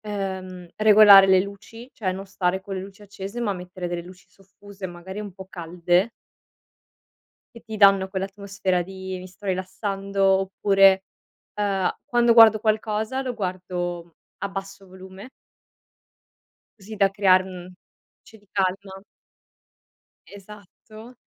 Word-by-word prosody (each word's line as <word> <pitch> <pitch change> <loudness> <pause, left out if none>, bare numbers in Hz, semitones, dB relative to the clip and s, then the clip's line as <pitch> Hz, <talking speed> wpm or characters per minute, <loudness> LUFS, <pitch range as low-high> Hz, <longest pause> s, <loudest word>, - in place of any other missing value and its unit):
ehm, 190 -3 -6
regolare 210 -2 +8
le 190 -1 +5
luci, 215 +5 -11
cioè 190 -4 -3
non 190 +1 -7
stare 190 -1 -2
con 195 0 -7
le 190 - -4
luci 195 +2 -12
accese, 200 +2 -8
ma 220 -4 -1
mettere 180 -1 -7
delle 175 0 -4
luci 180 +1 -15
soffuse, 195 0 -12
magari 180 +3 -9
un 205 -2 -8
po' 190 0 -11
calde 175 +3 0 1.5
che 235 - -12
ti 220 -2 -7
danno 195 -2 +5
quell'atmosfera 195 -1 -3
di: 190 0 -7
"Mi 185 - -10
sto 195 +2 -12
rilassando" 195 +1 -3 0.2
oppure, 195 0 +3 0.5
ehm, 195 -3 0 0.2
quando 240 -1 +3
guardo 225 -2 +7
qualcosa 215 +3 -1
lo 255 -1 -3
guardo 180 -4 -5 0.2
a 200 - -3
basso 195 0 -8
volume 190 +4 -12 1.5
così 210 +3 -10
da 200 -2 +3
crearm 185 -2 +1 0.4
luci 220 - -19
di 205 -1 -27
calma. 195 0 -3 1.3
Esatto. 210 +4 -14
195 Hz, 125 wpm, -23 LUFS, 185-205 Hz, 1.5 s, regolare